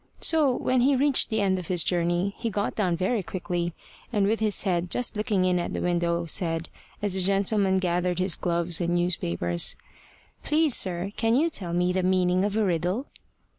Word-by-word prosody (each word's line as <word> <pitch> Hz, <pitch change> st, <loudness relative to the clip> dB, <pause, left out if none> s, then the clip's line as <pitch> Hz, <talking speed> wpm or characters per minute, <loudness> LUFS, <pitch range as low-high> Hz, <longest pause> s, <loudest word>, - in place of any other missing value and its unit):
So, 300 Hz, -6 st, +3 dB
when 255 Hz, 0 st, +1 dB
he 275 Hz, +3 st, +3 dB
reached 275 Hz, +1 st, +3 dB
the 220 Hz, -2 st, 0 dB
end 190 Hz, -2 st, +1 dB
of 175 Hz, -, -8 dB
his 180 Hz, -3 st, +2 dB
journey, 175 Hz, +2 st, 0 dB
he 230 Hz, -, -2 dB
got 205 Hz, -1 st, -2 dB
down 185 Hz, -5 st, 0 dB
very 195 Hz, +5 st, 0 dB
quickly, 175 Hz, -4 st, -4 dB, 0.4 s
and 205 Hz, -4 st, +1 dB
with 220 Hz, +3 st, +1 dB
his 215 Hz, -2 st, 0 dB
head 180 Hz, -2 st, -1 dB
just 245 Hz, +5 st, 0 dB
looking 210 Hz, -3 st, 0 dB
in 180 Hz, -1 st, +2 dB
at 175 Hz, -, -4 dB
the -, -, -2 dB
window, 170 Hz, -1 st, 0 dB
said, 165 Hz, -1 st, -2 dB, 0.3 s
as 205 Hz, -2 st, +2 dB
the 190 Hz, -, +2 dB
gentleman 195 Hz, 0 st, +2 dB
gathered 180 Hz, -1 st, 0 dB
his 185 Hz, -1 st, +1 dB
gloves 170 Hz, 0 st, -1 dB
and 175 Hz, 0 st, 0 dB
newspapers: 85 Hz, -, 0 dB, 0.7 s
"Please, 305 Hz, -3 st, +2 dB
sir, 185 Hz, +1 st, 0 dB
can 225 Hz, +1 st, +2 dB
you 325 Hz, +5 st, +2 dB
tell 175 Hz, -, -4 dB
me 180 Hz, +1 st, +1 dB
the 185 Hz, -, 0 dB
meaning 185 Hz, 0 st, +2 dB
of 205 Hz, +1 st, -1 dB
a 220 Hz, -, +2 dB
riddle?" 180 Hz, -, -1 dB
185 Hz, 195 wpm, -26 LUFS, 175-210 Hz, 0.7 s, So